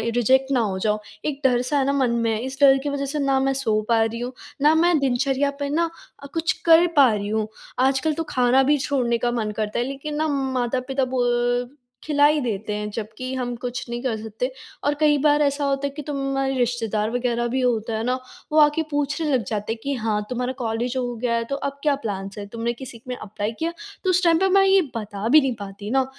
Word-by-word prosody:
Reject 265 Hz, +3 st, +3 dB
ना 260 Hz, -, +3 dB
हो 205 Hz, -5 st, 0 dB
जाओ। 210 Hz, +1 st, 0 dB, 0.3 s
एक 290 Hz, -2 st, -3 dB
डर 245 Hz, -2 st, +4 dB
सा 255 Hz, +4 st, -1 dB
है 270 Hz, -, +2 dB
न 280 Hz, -, +1 dB
मन 260 Hz, -3 st, +2 dB
में 230 Hz, -1 st, +1 dB
है। 215 Hz, -, -1 dB
इस 265 Hz, +1 st, -6 dB
डर 270 Hz, -1 st, +7 dB
की 290 Hz, -, -1 dB
वजह 280 Hz, 0 st, -2 dB
से 290 Hz, +2 st, -3 dB
ना 275 Hz, -1 st, +2 dB
मैं -, -, +1 dB
सो 225 Hz, -6 st, 0 dB
पा 230 Hz, -1 st, +4 dB
रही 225 Hz, +1 st, -3 dB
हूँ, 245 Hz, +2 st, -4 dB, 0.3 s
ना 300 Hz, +2 st, +5 dB
मैं 340 Hz, +1 st, +4 dB
दिनचर्या 270 Hz, +1 st, +1 dB
पे 285 Hz, 0 st, -2 dB
ना 330 Hz, +3 st, +1 dB, 0.3 s
अ, -, -, -7 dB
कुछ 330 Hz, 0 st, +1 dB
कर 335 Hz, +1 st, +7 dB
पा 275 Hz, -5 st, +7 dB
रही 205 Hz, -1 st, -2 dB
हूँ। 215 Hz, 0 st, 0 dB, 0.4 s
आजकल 275 Hz, +4 st, +1 dB
तो 330 Hz, -, -2 dB
खाना 255 Hz, +1 st, +3 dB
भी 295 Hz, +2 st, +3 dB
छोड़ने 240 Hz, -4 st, +2 dB
का 240 Hz, +1 st, 0 dB
मन 220 Hz, -3 st, -1 dB
करता 215 Hz, +1 st, -1 dB
है 240 Hz, -, 0 dB
लेकिन 275 Hz, +3 st, -5 dB
न 315 Hz, -, +1 dB, 0.3 s
माता-पिता 255 Hz, +2 st, -1 dB
बो 245 Hz, 0 st, +1 dB, 0.3 s
खिला 290 Hz, -2 st, +3 dB
ही 300 Hz, +1 st, +4 dB
देते 215 Hz, -3 st, -3 dB
हैं 210 Hz, 0 st, -3 dB
जबकि 230 Hz, +5 st, -5 dB
हम 245 Hz, -1 st, -3 dB
कुछ 245 Hz, +1 st, -5 dB
नहीं 240 Hz, 0 st, -4 dB
कर 250 Hz, -4 st, 0 dB
सकते। 220 Hz, +4 st, -4 dB, 0.3 s
और 290 Hz, -, +2 dB
कई 300 Hz, -1 st, +4 dB
बार 295 Hz, 0 st, +4 dB
ऐसा 285 Hz, 0 st, +1 dB
होता 275 Hz, 0 st, 0 dB
है -, -, -3 dB
कि 300 Hz, -, -5 dB
तुम्हारे 275 Hz, -1 st, -1 dB
रिश्तेदार 225 Hz, -3 st, 0 dB
वग़ैरह 240 Hz, -1 st, 0 dB
भी 255 Hz, +3 st, -1 dB
होता 230 Hz, -3 st, 0 dB
है 220 Hz, -, -2 dB
ना 250 Hz, +2 st, +1 dB, 0.4 s
वो 310 Hz, -, +4 dB
आके 300 Hz, +2 st, +4 dB
पूछने 290 Hz, +2 st, -1 dB
लग 250 Hz, -3 st, +2 dB
जाते 210 Hz, 0 st, -2 dB
हैं 225 Hz, -, -10 dB
कि 280 Hz, -, -1 dB
हाँ, 220 Hz, -3 st, -1 dB
तुम्हारा 250 Hz, +1 st, -2 dB
कॉलेज 235 Hz, +2 st, -2 dB
हो 245 Hz, -1 st, -2 dB
गया 235 Hz, +1 st, -1 dB
है 230 Hz, -, 0 dB
तो 275 Hz, -, -1 dB
अब 280 Hz, 0 st, -4 dB
क्या 295 Hz, -2 st, +3 dB
प्लान्स 200 Hz, -6 st, -5 dB
हैं? 205 Hz, -, -6 dB
तुमने 230 Hz, +3 st, -3 dB
किसी 240 Hz, -2 st, -10 dB
में 250 Hz, -, -3 dB
एप्लाई 210 Hz, -1 st, -4 dB
किया? 330 Hz, +1 st, -1 dB, 0.3 s
तो 375 Hz, -, +1 dB
उस 365 Hz, 0 st, +3 dB
टाइम 335 Hz, -2 st, +5 dB
पे 385 Hz, -, +3 dB
मैं 390 Hz, -, +6 dB
ये 385 Hz, 0 st, +5 dB
बता 210 Hz, -1 st, -4 dB
भी 305 Hz, +4 st, +7 dB
नहीं 265 Hz, -2 st, 0 dB
पाती 200 Hz, +1 st, -7 dB
न, 265 Hz, -1 st, +3 dB
255 Hz, 240 wpm, -23 LUFS, 230-280 Hz, 0.4 s, डर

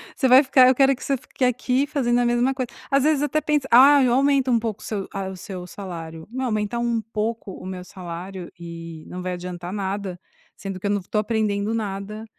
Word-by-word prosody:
Você 265 Hz, -, +2 dB
vai 260 Hz, +3 st, +8 dB
ficar 260 Hz, -1 st, +6 dB
eu 255 Hz, -, +5 dB
quero 270 Hz, +1 st, +4 dB
que 255 Hz, -, -11 dB
você 275 Hz, -, +1 dB
fique 255 Hz, +1 st, -3 dB
aqui 250 Hz, +3 st, +1 dB
fazendo 245 Hz, -4 st, +1 dB
a 245 Hz, -, +2 dB
mesma 240 Hz, +2 st, +2 dB
coisa. 255 Hz, -2 st, -3 dB, 0.2 s
Às 275 Hz, 0 st, +4 dB
vezes 300 Hz, -2 st, +3 dB
até 295 Hz, +1 st, +1 dB
pensa: 295 Hz, -2 st, 0 dB
"Ah, 275 Hz, +3 st, +8 dB
eu 245 Hz, -, +3 dB
aumento 270 Hz, 0 st, +3 dB
um 235 Hz, -, +4 dB
pouco 215 Hz, -2 st, -4 dB
seu 200 Hz, -3 st, -4 dB
a 195 Hz, -1 st, -3 dB
o 190 Hz, -, -8 dB
seu 180 Hz, -1 st, -7 dB
salário.". 165 Hz, -4 st, -8 dB
Não, 260 Hz, +3 st, -3 dB
aumentar 215 Hz, 0 st, -1 dB
um 235 Hz, -1 st, 0 dB
pouco 220 Hz, -1 st, -3 dB
o -, -, -10 dB
meu 185 Hz, -1 st, -6 dB
salário 180 Hz, 0 st, -8 dB
e 165 Hz, -1 st, -8 dB
não 180 Hz, 0 st, -6 dB
vai 180 Hz, 0 st, -3 dB
adiantar 175 Hz, 0 st, -6 dB
nada, 195 Hz, -2 st, -3 dB, 0.4 s
sendo 195 Hz, -2 st, -5 dB
que 185 Hz, -, -8 dB
eu -, -, +1 dB
não 205 Hz, -, +1 dB
estou 205 Hz, +3 st, -2 dB
aprendendo 215 Hz, -1 st, 0 dB
nada 210 Hz, 0 st, -4 dB
215 Hz, 225 wpm, -23 LUFS, 190-255 Hz, 0.4 s, vai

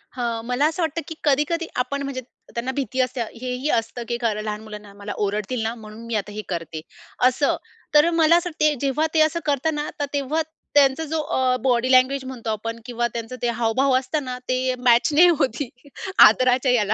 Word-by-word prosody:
हं. 235 Hz, -2 st, -2 dB
मला 250 Hz, +4 st, +1 dB
असं 325 Hz, +3 st, -3 dB
वाटतं, 325 Hz, +1 st, -1 dB
की 320 Hz, -, -6 dB
कधी-कधी 300 Hz, +4 st, +1 dB, 0.2 s
आपण 280 Hz, +2 st, -4 dB
म्हणजे 270 Hz, -2 st, -4 dB
त 245 Hz, -, -25 dB
त्यांना 255 Hz, +2 st, -2 dB
भीती 260 Hz, -2 st, -3 dB
असते 255 Hz, -1 st, -1 dB
हे 250 Hz, +2 st, -5 dB
ही 265 Hz, +4 st, -2 dB
असतं, 230 Hz, 0 st, -1 dB
की 235 Hz, -, -1 dB
खरं 215 Hz, -2 st, 0 dB
लहान 210 Hz, 0 st, -4 dB
मुलांना, 210 Hz, -2 st, -10 dB
"मला 205 Hz, +1 st, -7 dB
ओरडतील 210 Hz, +4 st, -2 dB
ना 225 Hz, +1 st, -1 dB
म्हणून 220 Hz, 0 st, -11 dB
मी 230 Hz, -1 st, -3 dB
आता 210 Hz, 0 st, -2 dB
हे 215 Hz, -, -4 dB
करते," 165 Hz, -3 st, -4 dB, 0.5 s
असं. 270 Hz, +3 st, +1 dB, 0.4 s
तर 300 Hz, +3 st, +6 dB
मला 330 Hz, 0 st, +5 dB
असं 350 Hz, 0 st, -1 dB
वाटते 305 Hz, -2 st, +2 dB
जेव्हा 280 Hz, +3 st, +1 dB
ते 320 Hz, -, +3 dB
असं 315 Hz, +2 st, +2 dB
करतात 290 Hz, +2 st, +1 dB
ना 295 Hz, 0 st, -3 dB
तर 290 Hz, -, 0 dB
तेव्हा 285 Hz, +3 st, 0 dB, 0.3 s
त्यांचा 285 Hz, +2 st, +4 dB
जो 315 Hz, +1 st, -2 dB
अ, 260 Hz, -5 st, +1 dB
बॉडी 250 Hz, 0 st, +2 dB
लँग्वेज 260 Hz, +1 st, +4 dB
म्हणतो 250 Hz, -3 st, -6 dB
आपण 230 Hz, +2 st, -3 dB
किंवा 240 Hz, -1 st, -1 dB
त्यांचं 230 Hz, +1 st, -5 dB
ते 240 Hz, -, 0 dB
हावभाव 255 Hz, +4 st, +2 dB
असताना 260 Hz, -1 st, -3 dB
ते 255 Hz, 0 st, +1 dB
मॅच 245 Hz, +3 st, +4 dB
नाही 340 Hz, +5 st, +7 dB
होती. 255 Hz, +1 st, -1 dB, 0.6 s
आदराच्या 255 Hz, 0 st, +3 dB
ह्याला. 215 Hz, -3 st, +2 dB
255 Hz, 200 wpm, -23 LUFS, 230-290 Hz, 0.6 s, नाही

